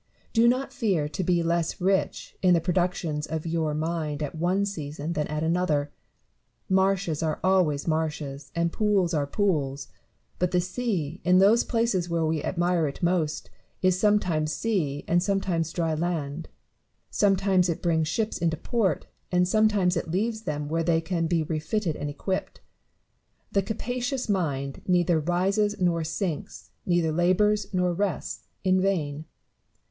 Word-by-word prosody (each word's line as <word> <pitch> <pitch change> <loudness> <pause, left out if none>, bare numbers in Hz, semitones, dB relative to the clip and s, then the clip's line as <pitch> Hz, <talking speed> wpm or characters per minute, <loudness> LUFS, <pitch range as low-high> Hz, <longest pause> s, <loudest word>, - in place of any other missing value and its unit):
Do 230 0 +5
not 255 +3 +1
fear 195 - 0
to 155 +5 -3
be 175 -1 +2
less 170 0 0
rich 190 +1 0
in 180 -2 +5
the - - +3
productions 175 -3 -1
of 160 0 -4
your 160 -2 -1
mind 155 -2 -2
at 145 - -4
one 180 +5 +1
season 155 -4 -4
than 150 -2 -1
at 150 +1 -2
another. 160 -4 +1 0.8
Marshes 190 -4 +1
are 160 -1 -1
always 180 -7 +2
marshes, 150 -3 -2
and 170 0 0
pools 200 -5 +2
are 145 -3 0
pools; 145 -7 -1 0.5
but 180 - +2
the 180 - +2
sea, 180 - -2
in 180 +1 +4
those 205 +5 +5
places 225 -7 0
where 165 -1 +1
we 155 -1 0
admire 175 -2 +1
it 140 - -7
most, 170 -3 0 0.3
is 185 -1 +3
sometimes 180 -7 +2
sea 160 -12 -1
and 175 +1 +3
sometimes 185 -4 0
dry 165 -1 -1
land; 160 -2 -3 0.6
sometimes 195 -2 +3
it 165 - -3
brings 160 -3 +2
ships 220 +6 -1
into 165 -2 0
port, 205 - 0 0.3
and 180 0 +3
some 215 +3 +4
times 190 -4 +1
it 170 0 -2
leaves 220 +6 -1
them 150 -1 -3
where 165 +2 0
they 165 0 +2
can 165 0 -1
be 165 -1 +1
refitted 160 +3 -2
and 145 - -4
equipped. 185 +6 -3 0.9
The 200 - +2
capacious 245 +5 -3
mind 140 -9 -1
neither 175 -2 +3
rises 195 +6 +1
nor 170 -2 +1
sinks, 165 0 -4 0.2
neither 175 -3 +2
labours 195 +5 +2
nor 180 -2 +1
rests, 200 +1 -3 0.2
in 185 -1 +3
vain. 155 -6 -1
175 Hz, 155 wpm, -26 LUFS, 155-195 Hz, 0.9 s, Do